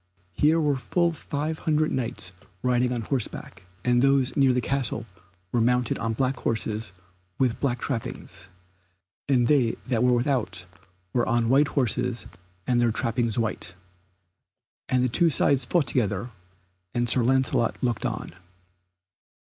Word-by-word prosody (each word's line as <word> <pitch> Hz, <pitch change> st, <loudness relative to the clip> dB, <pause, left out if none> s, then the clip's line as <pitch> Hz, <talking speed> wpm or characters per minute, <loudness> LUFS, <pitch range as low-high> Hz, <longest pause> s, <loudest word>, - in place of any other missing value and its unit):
Here 155 Hz, -, +3 dB
were 145 Hz, -3 st, +1 dB
full 170 Hz, +6 st, +1 dB
five 155 Hz, 0 st, -4 dB
hundred 155 Hz, -1 st, +1 dB
Knights 115 Hz, -8 st, -3 dB, 0.3 s
riding 125 Hz, 0 st, +2 dB
on 120 Hz, -2 st, -1 dB
horseback, 100 Hz, -6 st, -3 dB, 0.2 s
and 120 Hz, -1 st, +3 dB
those 135 Hz, -1 st, +3 dB
near 135 Hz, -2 st, +4 dB
the 125 Hz, -, +1 dB
castle 125 Hz, -3 st, 0 dB, 0.5 s
were 120 Hz, -, +2 dB
mounted 125 Hz, 0 st, +1 dB
on 115 Hz, 0 st, -1 dB
black 130 Hz, +3 st, 0 dB
horses 110 Hz, -1 st, -2 dB, 0.5 s
with 125 Hz, -3 st, +1 dB
black 125 Hz, -4 st, 0 dB
trappings, 115 Hz, -7 st, -5 dB, 0.8 s
and 125 Hz, -3 st, +4 dB
they 125 Hz, -3 st, +3 dB
that 115 Hz, -4 st, +1 dB
were 125 Hz, 0 st, +4 dB
without 120 Hz, -8 st, 0 dB, 0.5 s
were 120 Hz, -, +1 dB
on 115 Hz, -1 st, +2 dB
white 140 Hz, +3 st, +5 dB
horses 125 Hz, -2 st, 0 dB, 0.4 s
and 120 Hz, -1 st, +2 dB
their 120 Hz, -1 st, +3 dB
trappings 115 Hz, -1 st, 0 dB
white. 110 Hz, -5 st, -2 dB, 1.1 s
And 125 Hz, -1 st, +2 dB
the -, -, +3 dB
two 170 Hz, +7 st, +2 dB
sides 140 Hz, -3 st, +3 dB
fought 165 Hz, +4 st, +2 dB
together, 115 Hz, -2 st, -1 dB, 0.6 s
and 120 Hz, 0 st, +1 dB
Sir 120 Hz, +2 st, +4 dB
Lancelot 130 Hz, -2 st, +1 dB
looked 120 Hz, -3 st, 0 dB
on. -, -, -5 dB
125 Hz, 140 wpm, -26 LUFS, 115-135 Hz, 1.1 s, white